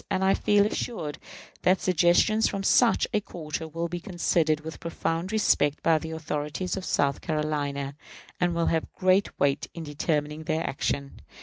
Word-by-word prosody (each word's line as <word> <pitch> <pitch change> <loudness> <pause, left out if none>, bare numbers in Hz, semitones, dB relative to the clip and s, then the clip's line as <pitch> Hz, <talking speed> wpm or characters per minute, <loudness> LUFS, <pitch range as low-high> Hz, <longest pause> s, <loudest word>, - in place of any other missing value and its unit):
And 190 - 0
I 190 0 +4
feel 205 -1 +3
assured 175 -8 -3 0.4
that 185 +1 +3
suggestions 185 +5 +3
from 195 -1 -3
such 235 +4 +4
a 210 - +2
quarter 160 -3 -6
will 165 +2 -3
be 175 +1 -4
considered 165 -4 +1
with 160 +1 -8
profound 165 +2 -2
respect 150 -9 +2
by 160 -1 +4
the 160 - -6
authorities 155 +2 -3
of 190 -2 -5
South 140 -1 +1
Carolina, 145 -3 -2 0.4
and 175 -1 +1
will 170 0 +1
have 160 -1 0
great 185 +2 +2
weight 140 0 +1
in 165 - -5
determining 150 0 -2
their 160 0 -1
action. 140 0 -3
165 Hz, 165 wpm, -27 LUFS, 150-185 Hz, 0.4 s, I